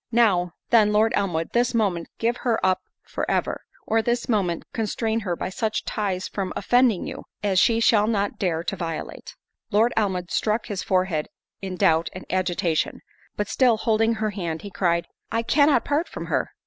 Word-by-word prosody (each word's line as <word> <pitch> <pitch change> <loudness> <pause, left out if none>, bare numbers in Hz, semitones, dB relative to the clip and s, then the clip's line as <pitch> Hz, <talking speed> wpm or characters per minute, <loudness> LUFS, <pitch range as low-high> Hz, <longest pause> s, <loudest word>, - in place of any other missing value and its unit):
Now, 190 -7 +3 0.2
then, 215 -3 +5
Lord 215 +2 +3
Elmwood, 170 -5 -1
this 240 0 +2
moment 190 -7 0
give 235 +2 0
her 235 -3 0
up 185 0 +2 0.2
for - - -5
ever, - - 0 0.2
or 225 0 +2
this 240 +2 -1
moment 190 -7 0
constrain 225 0 -1
her 185 -5 -2
by - - -4
such 215 +3 -2
ties 195 -3 -2
from 195 -2 -4
offending 245 -2 +3
you, - - -7 0.2
as 195 -3 +3
she 230 +2 +4
shall 215 -2 +4
not 205 -3 -1
dare 170 -4 0
to 195 - -2
violate." 165 -4 -6 0.3
Lord 225 +3 +3
Elmwood 190 -5 -1
struck 215 +1 0
his 200 -3 -4
forehead 185 -5 0 0.3
in 190 -1 -4
doubt 165 -4 +3
and 185 - -8
agitation; 175 -3 0 0.3
but, 210 - -2
still 235 +1 +3
holding 225 0 +2
her 215 -1 -1
hand, 170 -5 -4
he 200 - -7
cried, 170 -2 +1 0.3
"I 230 0 0
cannot 285 0 +3
part 295 +4 0
from - - -6
her." - - -1
205 Hz, 180 wpm, -24 LUFS, 180-225 Hz, 0.3 s, then